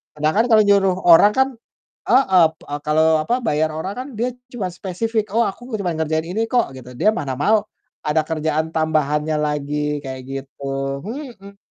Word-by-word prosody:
kadang 155 +1 0
kan 225 - +4
kalau 220 -1 +7
nyuruh 195 -2 +4 0.2
orang 205 +5 +8
kan 265 - +4 0.6
heeh, 190 -10 +5
p - - -74 0.2
kalau, 155 +1 +3 0.2
apa, 235 - 0
bayar 155 -5 +1
orang 185 +5 -4
kan 255 - -5
dia 240 +2 +1 0.2
cuma 210 -7 -3
spesifik, 210 +5 -2
"Oh 235 - +4
aku 245 +6 -9
cuma 180 -3 -1
ngerjain 160 0 -1
ini 220 +5 -1
kok" 245 -2 +3
gitu. 125 -1 -11
Dia - - +4
mana 140 - -3
mau 210 +7 +3 0.4
ada 150 +1 +2
kerjaan 155 0 -1
tambahannya 155 -1 0
lagi, 150 0 -2
kayak 130 -1 -6
gitu. 135 +1 -8 0.4
Mhm. 215 -5 -8
165 Hz, 170 wpm, -20 LUFS, 150-215 Hz, 0.6 s, orang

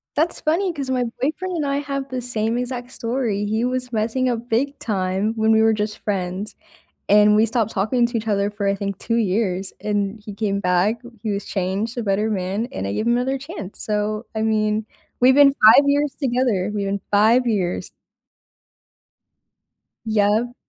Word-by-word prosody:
That's 320 +3 0
funny, 340 +3 +1
'cause 275 -3 -5
my 250 -1 +1 0.2
boyfriend 345 +6 -2
and 300 -3 -1
I 280 0 0
have 275 -1 -4
the 255 -1 -3
same 230 -1 -1
exact 250 0 -4
story. 230 -5 -2
He 220 +3 -1
was 250 -1 -2
messing 230 +4 0
up 240 0 -3
big 275 +5 0
time 195 +1 -1
when 220 0 +3
we 220 - +5
were 225 0 +4
just 210 0 -3
friends, 190 0 -3 0.6
and 210 0 +6
we 220 - +5
stopped 225 -1 0
talking 230 +5 +1
to 235 0 -4
each 225 0 -3
other 200 -1 +1
for, 205 -1 -3
I 195 - +2
think, 200 -1 -4
2 230 -1 -1
years, 195 -3 0
and 205 0 -1
he 210 - -7
came 200 -1 -1
back, 180 +6 +1 0.2
he 220 - -2
was 200 0 -2
changed, 200 +5 -2
a - - -1
better 210 +2 0
man, 195 +4 -2
and 95 - -4
I 100 - -2
gave 225 - -2
him 235 - +3
another 265 +2 0
chance, 275 - -6
so, 215 +1 -1
I 220 - -2
mean, 215 -1 0 0.3
we've 260 +1 +6
been 280 -1 +7
5 225 +6 +8
years 285 0 +1
together. 240 -7 0
We've 200 -1 -2
been 200 0 -2
5 225 +5 +4
years. 190 -6 -1 2.2
Yep. 220 +3 +1
220 Hz, 185 wpm, -21 LUFS, 205-250 Hz, 2.2 s, 5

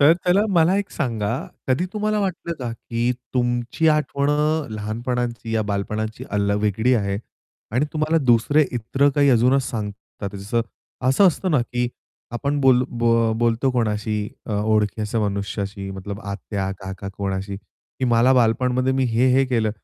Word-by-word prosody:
तर 145 +3 +7
त्याला 180 +3 +4
मला 175 0 +4
एक 205 -1 -3
सांगा 115 -9 -2 0.4
कधी 130 +7 +2
तुम्हाला 215 0 0
वाटलं 180 -3 -2
का, 125 -3 -3
की 115 +1 -2 0.2
तुमची 120 +5 +1
आठवण 145 -2 +1
अ, 150 +1 +1
लहानपणाची 115 +2 -3
या 110 - +2
बालपणाची 105 +2 -3
अल्ल 100 0 +1
वेगळी 110 +5 +2
आहे. 100 -3 0 0.5
आणि 125 +5 +2
तुम्हाला 155 +1 +1
दुसरे 125 +5 +4
इतर 125 +4 +1
काही 145 -1 +4
अजूनच 125 +3 +4
सांगतात 105 -2 -6
जसं, 105 +4 -1 0.5
असं 135 +10 +5
असतं 185 +3 -1
ना, 150 -5 +3
की 120 +1 -2 0.4
आपण 140 +4 -1
बोल्लो 130 -2 +5
बो 115 -1 +2
बोलतो 120 +3 +2
कोणाशी 110 -3 0 0.3
अ, 110 - -3
ओळखी 105 0 +1
असं 110 +2 -1
मनुष्याशी 100 0 -4
मतलब 100 +2 -6
आत्या, 100 -1 -4
काका 95 0 -6
कोणाशी, 100 0 -3
की 130 - -9
मला 120 +1 +4
बालपणमध्ये 125 +2 +2
मी 130 0 +1
हे, 120 +1 +2
हे 135 +1 +4
केलं. 115 -4 +1
120 Hz, 155 wpm, -22 LUFS, 105-135 Hz, 0.5 s, तर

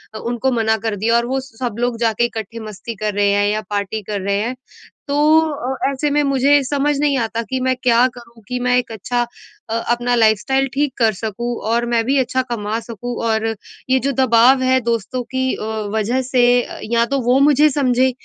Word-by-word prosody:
अ, - - -4
उनको 240 +3 -1
मना 220 0 +2
कर 210 - -1
दिया 225 +4 +1
और 235 - 0
वो 265 +1 -1
सब 245 -3 -6
लोग 245 -1 -1
जा 225 -2 +2
के 240 - +1
इकट्ठे 230 -1 -6
मस्ती 215 +3 -7
कर 210 -1 0
रहे 205 0 +2
हैं 205 0 +2
या 215 - -1
पार्टी 205 +1 -2
कर 200 -2 -2
रहे 200 +1 0
हैं। 240 +4 -3 0.5
तो 285 - -1 0.3
अ, 280 -4 -2
ऐसे 285 +2 -1
में 295 0 +2
मुझे 275 +1 +3
समझ 285 +2 0
नहीं 290 -2 +2
आता 230 0 -2
कि 260 0 -1
मैं 260 0 +1
क्या 245 +1 +4
करूँ 235 -1 -15
कि 250 0 -3
मैं 250 0 +2
एक 250 -2 -2
अच्छा 240 +3 -2 0.4
अ, 225 - -2 0.2
अपना 240 +1 +1
लाइफ़स्टाइल 235 +5 +2
ठीक 285 -1 0
कर 225 -3 +3
सकूँ 230 +4 -4
और 235 +2 +1
मैं 230 -1 +2
भी 275 +3 +2
अच्छा 260 +1 0
कमा 220 -1 -2
सकूँ। 235 +1 -6
और 220 0 0 0.4
ये 260 0 +4
जो 275 +3 -1
दबाव 260 0 +4
है 260 0 +3
दोस्तों 235 +2 -2
की 260 +1 -2
अ, - - -7 0.3
वज़ह 230 +5 0
से 255 -1 +1 0.5
या 235 0 +3
तो 275 - +2
वो 250 +2 +4
मुझे 300 +1 +5
समझें 260 -2 +2
240 Hz, 210 wpm, -19 LUFS, 225-260 Hz, 0.5 s, मुझे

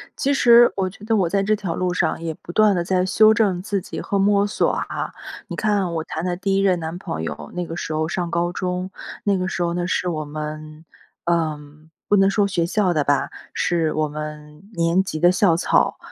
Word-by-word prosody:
其 280 0 0
实 240 -2 +6
我 190 -1 0
觉 195 - -15
得， 220 +1 +1
我 185 -5 +2
在 195 +1 +1
这 215 +2 +2
条 190 -5 -4
路 180 -1 -1
上 170 -2 0
也 165 -1 -3
不 175 - -10
断 210 0 +4
地 175 - 0
在 185 0 +1
修 215 +3 +5
正 195 -5 +1
自 200 -1 -2
己 - - -7
和 200 - -2
摸 200 +1 +3
索 205 - +1
啊。 - - -4 0.4
你 - - -6
看 200 -5 0
我 160 -1 -2
谈 160 - -5
的 180 -1 -1
第 195 0 0
1 195 - +2
任 185 -3 +2
男 160 +1 -5
朋 80 - -5
友， 75 -1 -6
那 180 -1 -3
个 165 - -6
时 170 - -5
候 155 0 0
上 175 0 -2
高 175 +1 0
中， 180 +1 -3 0.3
那 200 -2 +2
个 185 - -2
时 185 - -3
候 170 0 -1
呢， 175 0 -2
是 180 - -1
我 155 -2 -2
们， 155 +1 -7 0.4
呃， 165 -3 0 0.5
不 205 - +4
能 195 0 +5
说 200 0 +2
学 175 -4 0
校 185 -1 +1
的 150 - +1
吧， 145 0 +1 0.2
是 165 -3 0
我 155 0 0
们 150 +1 -8
年 170 +2 +2
级 155 -5 -5
的 175 +2 +5
校 185 -3 +3
草。 - - +2
180 Hz, 240 characters per minute, -22 LUFS, 160-195 Hz, 0.5 s, 实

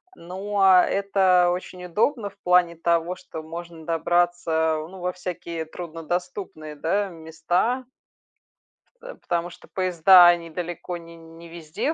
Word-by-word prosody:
Но 195 +4 -3 0.2
это 190 -3 +3
очень 180 0 -6
удобно 210 - 0
в - - -24
плане 180 -1 +3
того, 170 +1 0
что 180 -3 -9
можно 165 0 -9
добраться, 165 -1 +1
ну, 190 - -11
во 180 0 -2
всякие 170 -2 -6
труднодоступные, 165 - -6
да, 195 +7 -1
места. 175 +9 -2 1.2
Э, - - -9
потому 175 0 -3
что - - -15
поезда 185 -1 +6
они 170 -1 +2
далеко 175 +1 -5
не 170 0 -13
не 165 +1 -14
везде 165 - -3
175 Hz, 125 wpm, -24 LUFS, 165-185 Hz, 1.2 s, поезда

